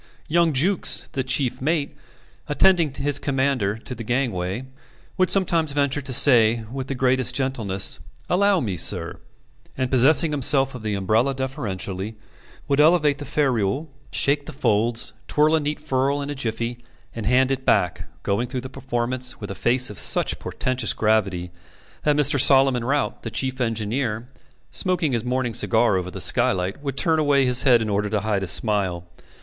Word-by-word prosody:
Young 170 Hz, +1 st, +2 dB
Jukes, 170 Hz, +8 st, +2 dB
the 130 Hz, -, -2 dB
chief 130 Hz, -1 st, +1 dB
mate, 150 Hz, 0 st, -1 dB, 0.5 s
attending 170 Hz, 0 st, +3 dB
his 145 Hz, +1 st, 0 dB
commander 130 Hz, -8 st, -1 dB
to 115 Hz, -, -8 dB
the 115 Hz, -1 st, -7 dB
gangway, 115 Hz, -3 st, -2 dB, 0.5 s
would 185 Hz, 0 st, +1 dB
sometimes 165 Hz, -6 st, +1 dB
venture 145 Hz, 0 st, 0 dB
to 135 Hz, -, -5 dB
say, 115 Hz, -3 st, +5 dB
with 135 Hz, 0 st, -5 dB
the 135 Hz, -, -4 dB
greatest 130 Hz, -1 st, +1 dB
gentleness, 115 Hz, -8 st, -1 dB, 0.3 s
"Allow 200 Hz, 0 st, +2 dB
me, 100 Hz, -7 st, -3 dB
sir" 85 Hz, 0 st, -1 dB, 0.6 s
and 130 Hz, -1 st, -2 dB
possessing 145 Hz, +5 st, +4 dB
himself 140 Hz, -1 st, +2 dB
of 125 Hz, -, -8 dB
the 105 Hz, -1 st, -3 dB
umbrella 110 Hz, +8 st, 0 dB
deferentially, 110 Hz, -, -5 dB, 0.5 s
would 140 Hz, -1 st, 0 dB
elevate 150 Hz, -2 st, +3 dB
the 145 Hz, -, -7 dB
ferule, 135 Hz, 0 st, -1 dB, 0.2 s
shake 140 Hz, +1 st, +1 dB
the -, -, -7 dB
folds, 115 Hz, -3 st, 0 dB
twirl 150 Hz, +1 st, +2 dB
a 160 Hz, -, +3 dB
neat 150 Hz, 0 st, -3 dB
furl 140 Hz, -1 st, -1 dB
in 145 Hz, 0 st, -4 dB
a -, -, -2 dB
jiffy, 120 Hz, -2 st, -3 dB, 0.3 s
and 115 Hz, -3 st, -5 dB
hand 130 Hz, +2 st, +2 dB
it 135 Hz, -1 st, -2 dB
back; 90 Hz, -7 st, 0 dB, 0.2 s
going 110 Hz, +5 st, -1 dB
through 125 Hz, 0 st, -5 dB
the 130 Hz, -, -8 dB
performance 125 Hz, -1 st, -3 dB
with 105 Hz, -2 st, -7 dB
a -, -, -4 dB
face 125 Hz, +3 st, +1 dB
of 105 Hz, -, -3 dB
such -, -, +4 dB
portentous 130 Hz, 0 st, -2 dB
gravity, 95 Hz, -5 st, 0 dB, 0.5 s
that 150 Hz, -1 st, +1 dB
Mr. 145 Hz, -2 st, +3 dB
Solomon 135 Hz, -3 st, +4 dB
Rout, 140 Hz, +2 st, -1 dB
the -, -, -6 dB
chief 130 Hz, -1 st, -1 dB
engineer, 115 Hz, 0 st, -2 dB, 0.4 s
smoking 180 Hz, -5 st, 0 dB
his 115 Hz, -3 st, -1 dB
morning 125 Hz, -1 st, -2 dB
cigar 115 Hz, -2 st, +2 dB
over 90 Hz, -1 st, -3 dB
the -, -, -8 dB
skylight, 95 Hz, +7 st, +1 dB
would 140 Hz, -2 st, -5 dB
turn 160 Hz, -2 st, +2 dB
away 145 Hz, -3 st, +2 dB
his 125 Hz, 0 st, +2 dB
head 120 Hz, -4 st, +4 dB
in 110 Hz, -, -4 dB
order 105 Hz, +1 st, -1 dB
to 105 Hz, -1 st, -1 dB
hide 105 Hz, -2 st, -1 dB
a 95 Hz, -, -3 dB
smile. 95 Hz, -2 st, +1 dB
130 Hz, 170 wpm, -22 LUFS, 110-145 Hz, 0.6 s, say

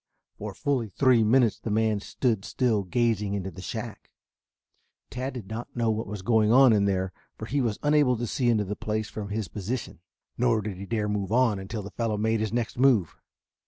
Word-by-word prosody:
For -, -, -6 dB
fully 130 Hz, -6 st, -1 dB
three 125 Hz, +2 st, +4 dB
minutes 115 Hz, 0 st, +3 dB
the -, -, -5 dB
man 110 Hz, 0 st, +1 dB
stood 110 Hz, 0 st, -1 dB
still 115 Hz, -4 st, +1 dB
gazing 105 Hz, 0 st, 0 dB
into 95 Hz, -1 st, -4 dB
the 95 Hz, +2 st, -10 dB
shack. -, -, -6 dB, 1.0 s
Tad 130 Hz, +3 st, -4 dB
did 115 Hz, -6 st, -7 dB
not 110 Hz, +3 st, -7 dB
know 115 Hz, -2 st, +1 dB
what 110 Hz, +1 st, -3 dB
was 100 Hz, -1 st, -6 dB
going 110 Hz, 0 st, +3 dB
on 130 Hz, -1 st, +7 dB
in 100 Hz, -2 st, +3 dB
there, 95 Hz, -1 st, 0 dB, 0.2 s
for -, -, -6 dB
he 140 Hz, +2 st, 0 dB
was 115 Hz, -4 st, -1 dB
unable 145 Hz, -4 st, +3 dB
to 120 Hz, -, -2 dB
see 120 Hz, +1 st, 0 dB
into 110 Hz, -3 st, +2 dB
the 105 Hz, +2 st, -4 dB
place 110 Hz, 0 st, -3 dB
from 105 Hz, -2 st, -6 dB
his 105 Hz, -1 st, -2 dB
position, 105 Hz, +6 st, -5 dB, 0.4 s
nor 120 Hz, -3 st, +3 dB
did 100 Hz, -3 st, -5 dB
he 100 Hz, +1 st, -8 dB
dare 110 Hz, -1 st, -1 dB
move 105 Hz, -2 st, -2 dB
on 115 Hz, -4 st, +3 dB
until 105 Hz, +2 st, -5 dB
the 100 Hz, -, -8 dB
fellow 115 Hz, -3 st, -1 dB
made 110 Hz, +1 st, +1 dB
his 110 Hz, -1 st, -1 dB
next 120 Hz, 0 st, -2 dB
move. 125 Hz, -10 st, +3 dB
110 Hz, 205 wpm, -27 LUFS, 100-120 Hz, 1.0 s, on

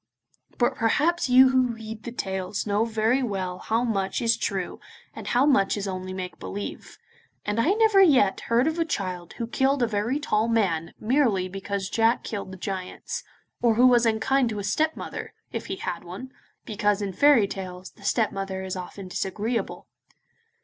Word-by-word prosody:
But 240 Hz, -, +1 dB
probably 300 Hz, +10 st, +2 dB
you 260 Hz, 0 st, +9 dB
who 255 Hz, -1 st, +3 dB
read 220 Hz, -1 st, -8 dB
the 235 Hz, -, -4 dB
tales 190 Hz, -3 st, -3 dB
know 210 Hz, +1 st, +1 dB
very 225 Hz, +3 st, +1 dB
well 190 Hz, -6 st, -3 dB
how 225 Hz, +2 st, 0 dB
much 195 Hz, -5 st, -1 dB
is 230 Hz, -1 st, +3 dB
true 195 Hz, -5 st, -3 dB, 0.3 s
and -, -, -8 dB
how 250 Hz, +3 st, +3 dB
much 215 Hz, -9 st, +3 dB
is 200 Hz, 0 st, -3 dB
only 185 Hz, -1 st, -4 dB
make 185 Hz, -1 st, -6 dB
believe, 205 Hz, +1 st, -6 dB, 0.5 s
and 210 Hz, +2 st, -1 dB
I 310 Hz, +12 st, +3 dB
never 435 Hz, -2 st, +5 dB
yet 260 Hz, -, +5 dB
heard 235 Hz, +2 st, +4 dB
of 320 Hz, +2 st, -1 dB
a -, -, +4 dB
child 185 Hz, -, -4 dB
who 235 Hz, -, -4 dB
killed 265 Hz, +3 st, +1 dB
a -, -, +3 dB
very 225 Hz, +6 st, -1 dB
tall 220 Hz, -6 st, +1 dB
man 190 Hz, -8 st, 0 dB
merely 220 Hz, -6 st, +2 dB
because 195 Hz, +1 st, -4 dB
Jack 225 Hz, +3 st, +2 dB
killed 200 Hz, -3 st, -5 dB
the 190 Hz, -, -8 dB
giants, 195 Hz, -, -5 dB, 0.4 s
or 235 Hz, -2 st, +3 dB
who 245 Hz, +3 st, +5 dB
was 240 Hz, -2 st, +5 dB
unkind 240 Hz, +3 st, +2 dB
to 215 Hz, -, -4 dB
his 200 Hz, 0 st, -2 dB
stepmother, 315 Hz, 0 st, -2 dB, 0.2 s
if -, -, -5 dB
he -, -, -3 dB
had 175 Hz, -2 st, -4 dB
one, 190 Hz, +10 st, -8 dB, 0.3 s
because, 210 Hz, -1 st, 0 dB
in 195 Hz, -1 st, -3 dB
fairy 280 Hz, -4 st, +5 dB
tales, 185 Hz, -1 st, -7 dB
the -, -, -22 dB
stepmother 195 Hz, -3 st, -1 dB
is 190 Hz, 0 st, -4 dB
often 185 Hz, +1 st, -7 dB
disagreeable. 210 Hz, +5 st, -3 dB
215 Hz, 175 wpm, -25 LUFS, 195-245 Hz, 0.5 s, you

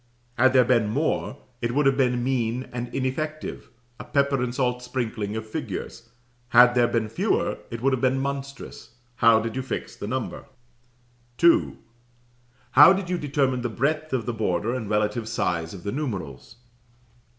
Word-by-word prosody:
Had 130 Hz, +2 st, +4 dB
there 130 Hz, -2 st, +5 dB
been 115 Hz, -4 st, +2 dB
more, 140 Hz, +2 st, -1 dB, 0.2 s
it 120 Hz, +1 st, -2 dB
would 145 Hz, 0 st, +2 dB
have 135 Hz, -1 st, +4 dB
been 125 Hz, -3 st, +1 dB
mean 125 Hz, -1 st, -1 dB
and 120 Hz, 0 st, -4 dB
ineffective, 150 Hz, +4 st, -4 dB, 0.3 s
a -, -, -6 dB
pepper 140 Hz, -2 st, +1 dB
and 125 Hz, -1 st, -1 dB
salt 125 Hz, -2 st, 0 dB
sprinkling 110 Hz, -4 st, -3 dB
of 110 Hz, 0 st, -5 dB
figures. 110 Hz, -, -6 dB, 0.4 s
Had 120 Hz, +1 st, +7 dB
there 120 Hz, -1 st, +3 dB
been 115 Hz, -2 st, -1 dB
fewer, 115 Hz, -, -1 dB
it 115 Hz, -1 st, -6 dB
would 135 Hz, 0 st, +3 dB
have 130 Hz, -, -1 dB
been 130 Hz, 0 st, +2 dB
monstrous. 140 Hz, -3 st, -6 dB, 0.2 s
How 115 Hz, -1 st, +5 dB
did 115 Hz, +1 st, -4 dB
you 130 Hz, -, -1 dB
fix 130 Hz, -, -5 dB
the 100 Hz, -, -6 dB
number? 130 Hz, +1 st, -4 dB, 0.9 s
"2. 170 Hz, 0 st, +4 dB, 0.9 s
How 150 Hz, +8 st, +9 dB
did 190 Hz, -2 st, -3 dB
you 180 Hz, -, 0 dB
determine 135 Hz, -3 st, 0 dB
the 120 Hz, -, -2 dB
breadth 155 Hz, +7 st, -1 dB
of 130 Hz, -4 st, -1 dB
the 120 Hz, -, -2 dB
border 105 Hz, +1 st, -1 dB
and 115 Hz, -5 st, -4 dB
relative 105 Hz, +2 st, 0 dB
size 85 Hz, -7 st, -1 dB
of 90 Hz, -3 st, -10 dB
the 100 Hz, -, -3 dB
numerals? 110 Hz, -, -5 dB
125 Hz, 170 wpm, -25 LUFS, 115-135 Hz, 0.9 s, How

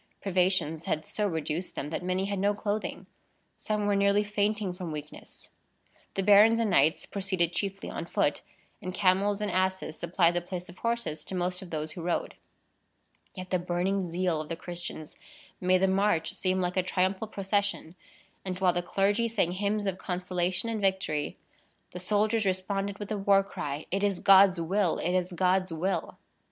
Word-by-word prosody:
Privations 180 Hz, -4 st, 0 dB
had 155 Hz, -, -1 dB
so 210 Hz, -1 st, -1 dB
reduced 160 Hz, 0 st, -3 dB
them, 150 Hz, -, -4 dB
that -, -, -2 dB
many 185 Hz, +1 st, -1 dB
had 200 Hz, -1 st, -2 dB
no 205 Hz, +1 st, +2 dB
clothing. 210 Hz, +1 st, -3 dB, 0.5 s
Some 210 Hz, -1 st, -2 dB
were 205 Hz, 0 st, +2 dB
nearly 200 Hz, +1 st, +3 dB
fainting 210 Hz, -1 st, -1 dB
from 180 Hz, -2 st, -6 dB
weakness. 150 Hz, 0 st, -9 dB, 0.7 s
The 195 Hz, -, 0 dB
barons 210 Hz, +3 st, +7 dB
and 225 Hz, -3 st, +1 dB
knights 160 Hz, 0 st, +3 dB
proceeded 185 Hz, -4 st, -1 dB
chiefly 195 Hz, +2 st, -3 dB
on -, -, -5 dB
foot, -, -, +1 dB, 0.4 s
and 185 Hz, 0 st, -5 dB
camels 195 Hz, +2 st, +2 dB
and 210 Hz, -2 st, -1 dB
asses 185 Hz, -3 st, -1 dB
supplied 170 Hz, 0 st, +2 dB
the 175 Hz, -, 0 dB
place 180 Hz, 0 st, -6 dB
of 175 Hz, -, -13 dB
horses 230 Hz, -10 st, -2 dB
to 190 Hz, -, -5 dB
most 180 Hz, 0 st, -1 dB
of 185 Hz, -, -9 dB
those 155 Hz, -1 st, -3 dB
who 170 Hz, -, -7 dB
rode. 175 Hz, +1 st, -1 dB, 1.0 s
Yet 185 Hz, -1 st, -8 dB
the 185 Hz, -, +2 dB
burning 180 Hz, +2 st, -1 dB
zeal 175 Hz, -2 st, 0 dB
of 155 Hz, -, -9 dB
the 165 Hz, -, -2 dB
Christians 175 Hz, -3 st, -7 dB, 0.4 s
made 185 Hz, 0 st, +3 dB
the -, -, +5 dB
march 190 Hz, -3 st, +1 dB
seem 185 Hz, 0 st, 0 dB
like 180 Hz, +1 st, -2 dB
a -, -, +5 dB
triumphal 190 Hz, +3 st, 0 dB
procession; 200 Hz, -4 st, -1 dB, 0.5 s
and 185 Hz, -1 st, -4 dB
while 185 Hz, -2 st, +3 dB
the 175 Hz, -, 0 dB
clergy 200 Hz, +6 st, +1 dB
sang 210 Hz, -6 st, 0 dB
hymns 205 Hz, +2 st, -1 dB
of 190 Hz, -1 st, -2 dB
consolation 180 Hz, +2 st, -1 dB
and 225 Hz, -2 st, -2 dB
victory, 190 Hz, -6 st, 0 dB, 0.5 s
the 180 Hz, -, -7 dB
soldiers 210 Hz, +4 st, +1 dB
responded 195 Hz, +2 st, -1 dB
with 205 Hz, -1 st, -7 dB
the 215 Hz, -2 st, -2 dB
war 195 Hz, 0 st, +4 dB
cry, 150 Hz, -6 st, -5 dB
"It 195 Hz, +2 st, 0 dB
is 200 Hz, -3 st, +1 dB
God's 195 Hz, -2 st, +6 dB
will! 180 Hz, +2 st, +1 dB
It 175 Hz, -, -1 dB
is 185 Hz, 0 st, 0 dB
God's 185 Hz, +1 st, +1 dB
will!" 170 Hz, +1 st, -2 dB
185 Hz, 180 wpm, -29 LUFS, 175-200 Hz, 1.0 s, barons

